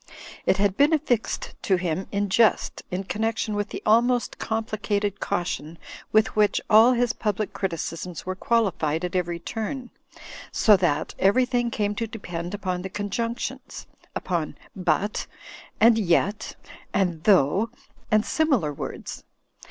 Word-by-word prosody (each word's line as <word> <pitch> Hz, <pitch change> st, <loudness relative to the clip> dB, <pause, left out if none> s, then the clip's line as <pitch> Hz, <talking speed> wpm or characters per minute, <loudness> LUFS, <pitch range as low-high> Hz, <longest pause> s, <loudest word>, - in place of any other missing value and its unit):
It 190 Hz, -, +4 dB
had 200 Hz, -1 st, +2 dB
been 290 Hz, +3 st, +5 dB
affixed 265 Hz, -7 st, 0 dB
to 190 Hz, -, +2 dB
him 180 Hz, 0 st, -2 dB
in 205 Hz, 0 st, 0 dB
jest 215 Hz, +3 st, +2 dB
in 185 Hz, +2 st, -3 dB
connection 220 Hz, +2 st, -1 dB
with 205 Hz, 0 st, -2 dB
the -, -, -7 dB
almost 240 Hz, +3 st, +2 dB
complicated 210 Hz, -2 st, -2 dB
cau 200 Hz, -3 st, -1 dB
tion 165 Hz, -1 st, -5 dB, 0.3 s
with 215 Hz, 0 st, +3 dB
which 210 Hz, -1 st, +3 dB
all 225 Hz, +4 st, +8 dB
his 240 Hz, -2 st, +1 dB
public 210 Hz, -1 st, -2 dB
criticisms 170 Hz, -1 st, -4 dB
were 185 Hz, -, -2 dB
qualified 185 Hz, -7 st, 0 dB
at 180 Hz, -, -5 dB
every 175 Hz, -2 st, 0 dB
turn; 225 Hz, +8 st, -5 dB, 0.6 s
so 215 Hz, -, +5 dB
that 165 Hz, -5 st, 0 dB
everything 245 Hz, +4 st, +3 dB
came 210 Hz, -2 st, -1 dB
to 230 Hz, +2 st, -3 dB
depend 180 Hz, -5 st, -5 dB
upon 185 Hz, -3 st, -3 dB
the 190 Hz, -, -5 dB
conjunctions; 220 Hz, +4 st, -4 dB, 0.3 s
upon 170 Hz, -4 st, -2 dB, 0.2 s
"but" 185 Hz, +3 st, 0 dB, 0.5 s
and 225 Hz, +1 st, +6 dB
"yet" 200 Hz, +2 st, +1 dB, 0.4 s
and 175 Hz, -4 st, 0 dB
"though" 195 Hz, +3 st, +4 dB, 0.4 s
and 215 Hz, 0 st, +3 dB
similar 265 Hz, -, +1 dB
words. -, -, -7 dB
205 Hz, 135 wpm, -25 LUFS, 180-225 Hz, 0.6 s, all